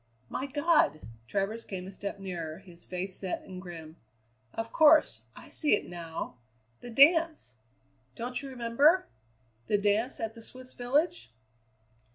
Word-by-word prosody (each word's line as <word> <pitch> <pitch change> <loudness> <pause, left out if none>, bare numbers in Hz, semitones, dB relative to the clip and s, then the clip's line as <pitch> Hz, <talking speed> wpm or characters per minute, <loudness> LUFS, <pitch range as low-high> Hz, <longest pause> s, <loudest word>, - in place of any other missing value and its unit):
"My 270 - -3
God!" 290 - +2 0.3
Travers 200 - -2
came 185 -2 -6
a 190 - -8
step 200 +1 -6
nearer, 170 -5 -5
his 175 -3 -13
face 185 +1 -5
set 190 -2 -4
and 185 -1 -9
grim. 165 -3 -10 0.5
"Of 225 0 -5
course! 310 0 +6
I - - -12
see 295 -8 +4
it - - -5
now 165 -6 -6 0.4
the 245 - -9
dance! 310 - +4 0.6
Don't 245 +2 0
you 275 - -7
remember? 260 +8 +3 0.6
The 205 - +3
dance 205 +5 0
at 225 0 -3
the 230 - -12
Swiss 255 +2 -10
village?" 250 - 0
220 Hz, 145 wpm, -29 LUFS, 180-265 Hz, 0.6 s, course